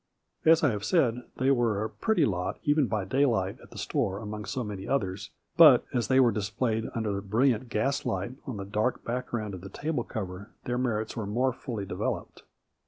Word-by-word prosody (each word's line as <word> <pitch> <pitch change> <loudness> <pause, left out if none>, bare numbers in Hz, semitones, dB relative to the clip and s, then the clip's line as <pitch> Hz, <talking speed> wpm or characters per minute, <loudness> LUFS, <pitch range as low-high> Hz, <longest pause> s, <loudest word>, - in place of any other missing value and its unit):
As 160 0 +6
I 145 - +4
have 105 -1 -4
said, 125 - +2
they 130 +1 +3
were 115 -5 +2
a - - -1
pretty 215 - +1
lot 90 -5 -2
even 145 -2 +3
by 105 -4 -1
daylight 110 -5 +1
at - - -15
the - - -12
store 95 0 -1
among 105 0 -6
so 120 +6 -3
many 100 -3 -6
others, 95 -7 -1 0.3
but, - - +8
as 120 -2 0
they 130 0 +4
were 125 -3 +6
displayed 110 +2 -1
under 110 -3 -1
the 100 - -2
brilliant 115 +4 +1
gaslight, 115 -3 -1 0.2
on 125 -5 -4
the 100 - -5
dark 105 +5 -1
background 115 -3 -3
of 95 - -7
the 95 - -8
table 145 - -2
cover, 100 -1 -6
their 125 0 -1
merits 110 -4 -1
were 110 -3 -3
more 125 +5 +1
fully 120 -6 -5
developed. - - -4
110 Hz, 195 wpm, -28 LUFS, 100-130 Hz, 0.3 s, but